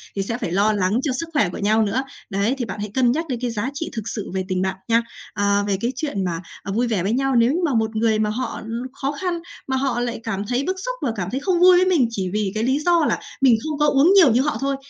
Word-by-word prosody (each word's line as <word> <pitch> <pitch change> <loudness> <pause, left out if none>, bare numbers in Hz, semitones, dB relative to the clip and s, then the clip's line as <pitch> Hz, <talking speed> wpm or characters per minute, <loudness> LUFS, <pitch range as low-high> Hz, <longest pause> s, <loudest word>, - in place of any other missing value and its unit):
Thì 195 - -1
sẽ 230 +4 -3
phải 170 - -4
lo 205 +4 +3
lắng 200 +4 +1
cho 285 - 0
sức 335 - -4
khỏe 215 -11 +2
của - - -7
nhau 215 +2 +2
nữa, 225 +6 0 0.3
đấy, 200 +6 0
thì 245 - -2
bạn 210 - -6
hãy 210 0 -4
cân 250 -2 +3
nhắc 325 +5 -2
đến 250 -3 -2
cái 245 -1 -1
giá 230 +3 -2
trị 320 +3 -4
thực 225 -1 -5
sự 210 -5 -5
về 190 - -1
tình 185 -1 -1
bạn 190 0 -1
nha. 230 0 +3 0.3
Ờ, 200 0 +1
về 195 -1 +1
cái 235 - 0
chuyện 260 -10 -2
mà, 170 -2 -2 0.2
ờ, 195 - -4
vui 240 +4 +1
vẻ 205 -6 0
với 200 - 0
nhau, 270 +1 +1
nếu 235 +2 +4
như 345 - 0
mà 285 - 0
một 220 -1 0
người 220 -1 +2
mà 215 - +1
họ 245 +5 -3 0.3
khó 275 0 -2
khăn, 355 -2 -1 0.3
mà 265 - 0
họ 260 -3 0
lại 240 -1 -2
cảm 205 -2 -3
thấy 250 +2 0
bức 375 +5 -1
xúc - - -2
và 245 - 0
cảm 185 -4 -3
thấy 265 - -1
không 350 +4 0
vui 365 0 +7
với 370 - +4
mình 320 -10 +3
chỉ 190 -4 -2
vì 210 -2 0
cái 215 - 0
lý 260 +4 +1
do 335 0 +3
là - - 0 0.2
mình 260 -4 +6
không 310 -1 -3
có 295 - +4
uống 290 +7 +5
nhiều 335 - +7
như 245 - +3
họ 295 +2 -1
thôi, 275 0 0
235 Hz, 300 wpm, -22 LUFS, 205-275 Hz, 0.3 s, vui